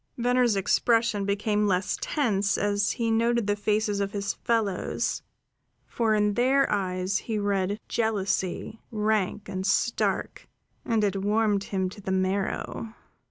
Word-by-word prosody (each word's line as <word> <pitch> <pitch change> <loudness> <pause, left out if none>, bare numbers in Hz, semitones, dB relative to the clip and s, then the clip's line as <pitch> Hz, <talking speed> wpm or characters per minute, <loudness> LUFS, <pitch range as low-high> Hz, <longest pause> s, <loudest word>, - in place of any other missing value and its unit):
Venner's 245 -2 +2
expression 225 +1 +2
became 210 +1 +1
less 185 -1 +1
tense 205 -9 +1
as 205 0 +1
he 230 -2 -1
noted 235 0 +2
the 205 0 +1
faces 210 0 0
of 200 0 -2
his 200 -1 -2
fellows; 220 -5 -1 0.6
for 225 -2 +1
in 210 -1 +2
their 265 +4 +3
eyes 185 -1 0
he 220 -2 -3
read 200 0 0
jealousy, 210 -1 -1
rank 210 -2 0
and 190 -1 -4
stark, 205 +4 0 0.4
and 225 -2 +1
it 200 -1 +1
warmed 205 -1 +1
him 190 -2 -1
to 200 +2 -9
the 190 - -4
marrow. 190 +4 -2
205 Hz, 135 wpm, -27 LUFS, 195-225 Hz, 0.6 s, their